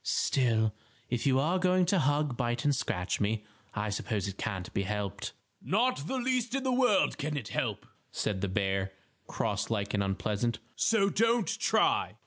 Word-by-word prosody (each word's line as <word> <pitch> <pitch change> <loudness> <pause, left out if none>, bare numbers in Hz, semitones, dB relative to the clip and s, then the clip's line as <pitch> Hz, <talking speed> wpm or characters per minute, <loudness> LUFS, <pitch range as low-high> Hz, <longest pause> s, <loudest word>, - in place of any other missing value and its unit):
"Still, 110 -5 +2 0.4
if 120 +1 0
you 130 -1 +4
are 170 +7 +2
going 185 0 +3
to 185 +2 +2
hug, 145 -2 +1
bite 120 0 -1
and 145 -1 +4
scratch 95 -7 -1
me, 105 +1 0 0.3
I 105 0 -1
suppose 105 -1 -2
it 95 - -5
can't 95 -3 -4
be - - +1
helped." 100 -1 -3 0.3
"Not 215 - +1
the 265 - -1
least 255 -1 0
in 270 - -1
the 260 - +1
world 245 -6 +3
can 150 +1 -2
it 125 -8 -5
be - - -9
helped," - - -1 0.3
said 95 -3 -2
the 100 - 0
bear, 95 -1 0 0.3
cross - - -1
like 105 -2 -1
and 105 - +1
unpleasant. 105 +4 -1 0.2
"So 200 -3 +3
don't 230 0 +3
try!" - - +2
120 Hz, 180 wpm, -30 LUFS, -, 0.4 s, you